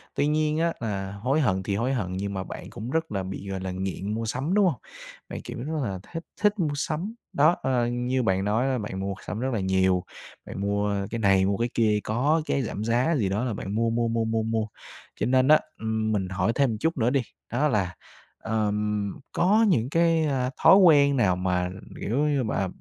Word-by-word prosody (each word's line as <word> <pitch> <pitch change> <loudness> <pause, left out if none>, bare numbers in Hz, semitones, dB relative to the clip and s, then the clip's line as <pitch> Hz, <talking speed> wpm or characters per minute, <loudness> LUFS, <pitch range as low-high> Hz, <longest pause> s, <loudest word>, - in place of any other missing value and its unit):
Tuy 145 - +2
nhiên 155 0 +1
á, 170 0 +1
là 100 -4 -3
hối 125 +9 0
hận 95 -7 +1
thì 100 - -1
hối 125 +6 0
hận, 95 -7 -2
nhưng 100 +1 -3
mà 95 -1 -3
bạn - - -8
cũng 115 +4 -7
rất 160 +2 -1
là 95 -2 -2
bị, 95 +1 -6
gọi 95 -1 -3
là, 95 0 -4
nghiện 95 +2 -3
mua 115 +1 -2
sắm, 135 - -2
đúng 205 -1 +4
hông? 155 -10 +1 0.5
Bạn, - - -6
kiểu - - -7
là, 125 - -5
rất 155 -3 -2
là 95 -1 -5
thích 165 0 -4 0.2
thích 210 -1 +2
mua 150 -4 0
sắm. 165 +8 -3 0.2
Đó, 155 +5 +4
ơ, 125 -2 +1
như 125 +1 -1
bạn 95 -1 +1
nói 115 +6 +1
là 130 -1 +1
bạn 105 -3 -5
mua 100 0 -2
sắm 105 - -3
rất 130 0 -1
là 110 - 0
nhiều, 95 -1 +2 0.4
bạn 100 - -6
mua 100 0 0
cái 115 - -2
này, 95 -3 +4
mua 100 0 +1
cái 120 +1 0
kia, 105 -2 +2
có 140 +9 +1
cái 140 - 0
giảm 110 -3 -4
giá 125 +8 +2
gì 105 -8 +1
đó 105 +5 -1
là 120 - -1
bạn 100 0 -5
mua, 115 +1 +2
mua, 115 +1 0
mua, 115 0 0
mua, 110 0 0
mua. 110 -1 -1 0.5
Cho - - +1
nên 130 +1 +3
á, 155 +1 +7 0.2
ừm, 110 0 -1
mình 95 -3 -1
hỏi 95 +3 0
thêm 140 -2 +3
một 110 - -3
chút 160 +5 0
nữa 120 -1 +2
đi. 135 0 +2 0.3
Đó 140 +5 +2
là, 95 - 0 0.4
ờm, 105 -2 -1 0.2
có 210 +6 +3
những 130 - +2
cái, 165 0 +3
ờ, 130 -3 0
thói - - +9
quen 145 -7 +6
nào 95 -7 +3
mà, 90 0 0 0.3
kiểu 115 +6 -1
như 140 -3 +1
mà, 100 -3 -1
115 Hz, 235 wpm, -26 LUFS, 100-140 Hz, 0.5 s, thói